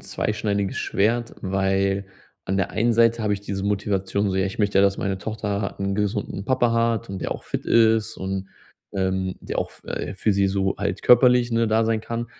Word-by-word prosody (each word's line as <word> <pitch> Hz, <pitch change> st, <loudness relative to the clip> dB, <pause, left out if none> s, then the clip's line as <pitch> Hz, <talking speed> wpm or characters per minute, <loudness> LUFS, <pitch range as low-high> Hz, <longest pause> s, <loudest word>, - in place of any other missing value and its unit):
zweischneidiges 100 Hz, -2 st, -2 dB
Schwert. 115 Hz, +4 st, 0 dB
Weil, 95 Hz, 0 st, 0 dB, 0.4 s
an 95 Hz, +1 st, 0 dB
der 95 Hz, -, 0 dB
einen 115 Hz, +2 st, +1 dB
Seite 115 Hz, 0 st, +3 dB
habe 105 Hz, -1 st, +1 dB
ich 100 Hz, -, -2 dB
diese 100 Hz, -1 st, -4 dB
Motivation, 100 Hz, 0 st, 0 dB
so: 95 Hz, -, -1 dB
„Ja, 95 Hz, -, +2 dB
ich 95 Hz, -, -7 dB
möchte 100 Hz, -2 st, +2 dB
ja, -, -, +6 dB
dass 100 Hz, 0 st, +2 dB
meine 95 Hz, -1 st, -1 dB
Tochter 105 Hz, -2 st, -3 dB
'n 100 Hz, 0 st, -1 dB
gesunden 105 Hz, -1 st, -2 dB
Papa 120 Hz, -2 st, +2 dB
hat 115 Hz, -1 st, +1 dB
und 95 Hz, -1 st, -5 dB
der -, -, -2 dB
auch -, -, -9 dB
fit -, -, -4 dB
ist 110 Hz, -1 st, +3 dB
und, 95 Hz, 0 st, -4 dB, 0.4 s
ähm, 95 Hz, -1 st, -1 dB
der -, -, -5 dB
auch -, -, -2 dB
f -, -, -20 dB
äh, -, -, -4 dB
für 105 Hz, +2 st, +1 dB
sie 100 Hz, 0 st, +3 dB
so 95 Hz, 0 st, 0 dB
halt 100 Hz, -1 st, -3 dB
körperlich, 125 Hz, 0 st, +5 dB
ne, 115 Hz, 0 st, +2 dB
da 110 Hz, +1 st, +2 dB
sein 115 Hz, -1 st, +1 dB
kann.” 115 Hz, +1 st, -4 dB
100 Hz, 210 wpm, -23 LUFS, 95-115 Hz, 0.4 s, ja